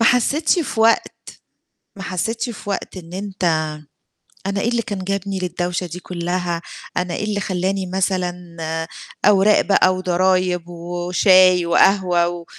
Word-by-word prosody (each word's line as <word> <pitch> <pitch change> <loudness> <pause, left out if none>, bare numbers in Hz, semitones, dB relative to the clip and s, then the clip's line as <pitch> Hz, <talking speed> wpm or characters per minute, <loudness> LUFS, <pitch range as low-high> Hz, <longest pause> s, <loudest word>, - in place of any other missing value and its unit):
ما 230 - +4
حسيتش 300 - +3
في 280 -8 -2
وقت 225 +1 +5 0.9
ما 195 - -8
حسيتش 225 +6 -2
في 205 -2 -7
وقت 195 - -4
إن 170 -2 -10
أنت 185 -5 -1 0.8
"أنا 200 0 -1
إيه 235 - +1
اللي 235 -1 0
كان 205 -3 -5
جابني 195 0 -2
للدوشة 180 0 -2
دي 175 +2 -7
كُلّها؟ 175 -1 -3 0.4
أنا 180 -1 -1
إيه - - -3
اللي 210 -1 -1
خلّاني 190 0 -1
مثلًا 180 -2 -2 0.7
أوراق 205 +1 +5
بقى 185 -2 +3
وضرايب 185 -1 +1
و 175 0 -6
وشاي 185 -1 +5
وقهوة 175 0 +3
و 175 -1 -6
185 Hz, 145 wpm, -20 LUFS, 175-200 Hz, 0.9 s, وقت